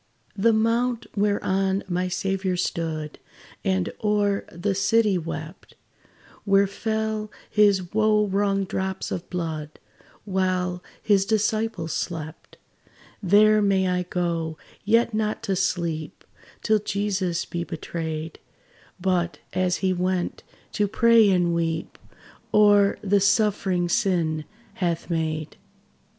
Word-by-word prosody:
The 225 +3 +3
mount 230 +2 +1
whereon 195 -1 +1
my 180 0 -1
Saviour 190 0 -1
stood, 160 -3 -3 0.4
And 95 -1 0
o'er 205 -1 +1
the 185 +4 -1
city 210 +1 +2
wept 160 +1 -7 0.7
Where 200 -1 +4
fell 220 +1 -2 0.2
his 200 -4 +3
wo 215 0 +3
wrung 195 0 +1
drops 190 0 -3
of 175 - -5
blood, 160 -4 -4 0.5
While 185 -2 -1 0.2
his 200 -3 +4
disciples 215 -5 0
slept 160 -2 -5 0.6
There 210 +2 +5
may 195 -2 +2
I 180 0 +1
go, 170 -3 -2 0.3
yet 230 +2 +3
not 215 +1 -1
to 195 -4 0
sleep 170 -4 -2 0.4
Till 215 -1 +3
Jesus 195 -4 -1
be 170 0 -4
betrayed; 160 -1 -5 0.6
But, 175 -2 0 0.2
as 185 0 +1
he 185 - +3
went, 185 0 -1 0.3
to 210 - +1
pray 230 0 +5
and 175 -2 +2
weep 165 -1 -2 0.5
O'er 205 -1 +5 0.2
sufferings 195 -3 +1
sin 165 -7 +1 0.3
hath 175 -3 -2
made. 155 -2 -2
190 Hz, 110 wpm, -24 LUFS, 170-210 Hz, 0.7 s, There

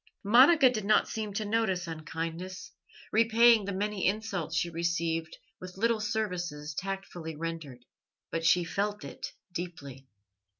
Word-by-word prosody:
Monica 260 +8 +7
did 230 -4 0
not 215 +2 +3
seem 215 -2 -4
to 210 +2 -3
notice 205 -4 0
unkindness, 165 +3 -6 0.4
repaying 230 0 +5
the 200 - -3
many 200 0 -1
insults 195 -5 -2
she 170 - +1
received 165 -1 -2 0.2
with 185 0 -9
little 230 +2 +2
services 180 -9 -3
tactfully 185 -3 -5
rendered, 155 -6 -6 0.5
but 165 0 -2
she 175 +2 +4
felt 205 +4 -2
it - - -7 0.2
deeply. 145 -7 -7
185 Hz, 130 wpm, -29 LUFS, 165-215 Hz, 0.5 s, Monica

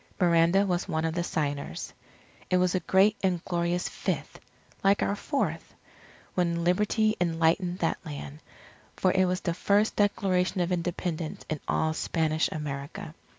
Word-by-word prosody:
Miranda 170 +2 +4
was 180 -2 -1
one 160 +1 -1
of 160 - -1
the 175 0 -1
signers. 145 -4 -3 0.6
It 185 - +3
was 180 0 +2
a 185 - +2
great 195 +4 +3
and 180 -3 0
glorious 175 0 0
Fifth - - -4 0.4
like 200 +1 +4
our 200 - 0
Fourth 280 +7 -2 0.6
when 170 -2 0
Liberty 210 +4 +2
enlightened 170 +1 +1
that 165 - -1
land. 145 -1 -7 0.6
For 185 - +2
it 185 0 +3
was 180 0 -1
the 170 - -1
first 205 +4 +2
Declaration 190 -3 +1
of 175 0 0
Independence 170 -2 -3
in 155 - -1
all 160 0 +1
Spanish 160 -1 0
America. 145 0 -5
175 Hz, 150 wpm, -28 LUFS, 165-190 Hz, 0.6 s, Miranda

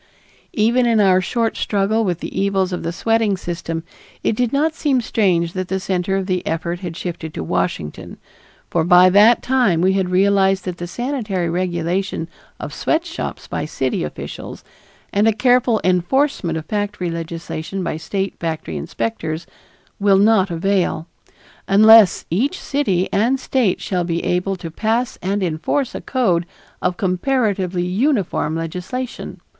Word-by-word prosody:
Even 240 +3 +3
in 230 -2 +3
our 190 -2 +4
short 225 +4 -1
struggle 210 +2 0
with 175 -4 -2
the 190 - -3
evils 195 -2 +1
of 180 - -3
the 165 - -3
sweating 225 +2 +1
system 165 -2 -4 0.4
it - - +1
did 245 0 0
not 305 +3 +1
seem 285 -5 +1
strange 180 -7 +1
that 185 -1 -3
the 190 +1 -1
center 190 0 -1
of 190 - -2
the 185 -2 -1
effort 170 +2 -2
had 175 -3 -6
shifted 165 -4 -6
to 85 - -3
Washington, 90 -3 -3 0.5
for 165 - +2
by 180 +2 +6
that 210 +5 +6
time 250 -10 +2
we 185 +2 +3
had 190 -2 0
realized 195 0 +3
that 180 -2 -4
the 175 - -4
sanitary 210 -7 -2
regulation 175 0 -1 0.3
of - - -6
sweatshops 335 +1 -2
by - - -3
city - - -2
officials, - - -7 0.5
and 205 +2 +3
a - - +6
careful 245 0 +3
enforcement 185 - +1
of 160 - -6
factory 205 -2 -2
legislation 165 +2 -5
by - - -2
state 190 +4 -3
factory 160 - -3
inspectors 160 - -3 0.5
will 200 -1 +4
not 200 -1 +4
avail, 175 -1 0 0.6
unless 215 0 +7
each 270 - 0
city 195 -11 0
and 240 +6 +2
State 250 -7 +1
shall 180 -2 -1
be 170 -1 -2
able 180 +2 0
to 170 -3 -8
pass 225 +7 -1
and 195 +2 -1
enforce 175 - -1
a - - -5
code 180 -10 0 0.3
of 180 0 0
comparatively 190 -2 0
uniform 195 - 0
legislation. 180 +10 -5
190 Hz, 150 wpm, -20 LUFS, 175-225 Hz, 0.6 s, unless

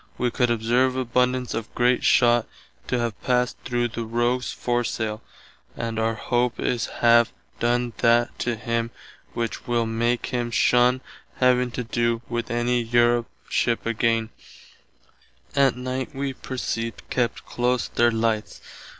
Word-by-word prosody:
We 125 -1 0
could 125 0 +1
observe 120 +3 +2
abundance 125 0 0
of 115 0 -4
great 125 +1 +2
shott 120 -1 +4 0.4
to 125 - 0
have 120 -3 -3
passed 125 -1 +1
through 120 -1 0
the 115 +1 -4
rogues 120 +2 0
foresaile, 115 -3 -2 0.6
and 115 -1 -3
our 115 0 +1
hope 120 +1 0
is 120 -2 0 0.2
have 120 0 +6 0.3
done 120 0 +1
that 120 +1 +2
to 120 -1 -1
him 115 +1 -2 0.5
which 115 -1 -3
[will] 120 -1 +1
make 115 +2 0
him 120 -1 -1
shunn 125 +2 +3 0.3
having 125 -1 +3
to 125 - -3
do 115 0 0
with 120 +1 -3
any 120 0 +1
Europe 120 0 +2 0.2
ship 120 -1 0
againe. 115 0 +1 1.2
Att 135 -3 +4
night 130 +1 -4
wee 135 0 -2
perceived 115 -3 -4
kept 120 -2 -1
close 125 0 0
their 120 0 +3
lights. 110 -1 -1
120 Hz, 140 wpm, -24 LUFS, 115-125 Hz, 1.2 s, have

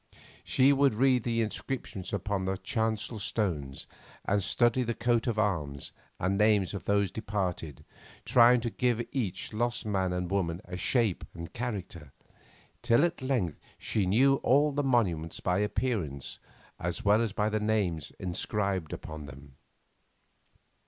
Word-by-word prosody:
She 135 +2 +4
would 140 -4 +3
read 130 +1 +3
the 115 0 0
inscriptions 110 -4 -4
upon 100 -1 -2
the 95 0 -1
chancel 110 +1 -2
stones 85 - -2 0.4
and 100 +1 +2
study 120 +6 +2
the 115 -2 -1
coats 115 0 +1
of 115 -3 0
arms 80 -10 -1 0.3
and 95 +3 0
names 105 -3 +3
of 100 - -6
those 100 -2 +2
departed, 95 - -3 0.4
trying 120 0 +6
to 115 -1 -2
give 125 -1 +1
to 120 +4 -6
each 105 -6 -2
lost 120 +2 -1
man 95 -3 0
and 90 0 -2
woman 90 -4 0
a 90 - -7
shape 110 0 +1
and 85 0 -8
character, 95 - -5 0.7
till 120 +4 +4
at 175 -3 -3
length 120 - -1 0.2
she 100 -4 -1
knew 135 +8 +4
all 145 +3 +3
the 145 +1 0
monuments 95 - 0
by 90 +1 0
appearance 105 - -2 0.4
as 85 +3 -3
well 105 +2 +5
as 115 -3 0
by 105 +1 0
the 110 0 0
names 100 -8 0
inscribed 95 -1 -2
upon 75 -2 -7
them. 70 0 -13
105 Hz, 150 wpm, -29 LUFS, 90-120 Hz, 0.7 s, trying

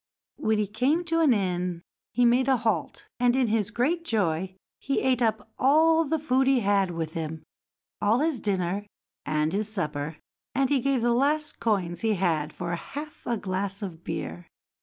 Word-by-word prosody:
When 220 0 +1
he 210 - +1
came 255 - +1
to 330 -1 0
an 315 -5 +5
inn 180 -4 -1 0.3
he 245 +2 +3
made 245 +2 +4
a 265 -1 +4
halt, 220 -9 -2
and 245 0 +3
in 265 -1 +3
his 215 -3 +1
great 285 +9 0
joy 190 - 0 0.2
he 275 - 0
ate 255 -2 +1
up 220 -1 0
all 320 +5 +5
the 320 +2 0
food 265 -3 +1
he 270 -2 +4
had 200 -2 +2
with 165 -2 -4
him, 160 -1 -4 0.6
all 215 +3 +3
his 310 -5 0
dinner 195 0 -1 0.4
and 155 +1 +1
his 210 +2 -1
supper, 155 -6 -3 0.4
and 270 +1 +2
he 280 - +4
gave 265 -1 +1
the 240 0 +3
last 295 +4 +1
coins 185 -6 0
he 220 -2 +2
had 165 -5 0
for 175 -1 -4
half 290 - -7
a 235 - 0
glass 195 +1 -3
of 170 -4 -7
beer. 85 +2 -5
220 Hz, 180 wpm, -27 LUFS, 180-265 Hz, 0.6 s, an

